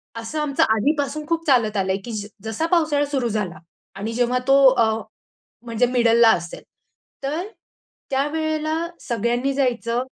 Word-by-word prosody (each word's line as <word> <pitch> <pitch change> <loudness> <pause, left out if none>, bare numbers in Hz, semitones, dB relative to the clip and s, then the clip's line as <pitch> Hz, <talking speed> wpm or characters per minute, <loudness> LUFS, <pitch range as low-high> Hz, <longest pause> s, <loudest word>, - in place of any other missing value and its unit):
असं 230 +7 -5
आमचं 290 -2 +1
आधीपासून 290 +5 -1
खूप 330 0 -1
चालत 230 -6 +3
आलंय, 190 0 0
की 240 - -6
ज 210 -2 -4 0.2
जसा 220 +8 -2
पावसाळा 310 -4 +2
सुरू 265 -4 0
झाला 205 -5 -3 0.4
आणि 210 +4 -4
जेव्हा 245 +1 +1
तो 275 0 +5
अ, 230 -4 +2 0.7
म्हणजे 230 +1 +1
मिडलला 235 -2 +4
असेल, 170 -3 -2 0.6
तर 310 +7 -2 0.6
त्यावेळेला 310 +3 -1 0.3
सगळ्यांनी 240 +3 -1
जायचं 240 -3 0
250 Hz, 135 wpm, -22 LUFS, 225-290 Hz, 0.7 s, तो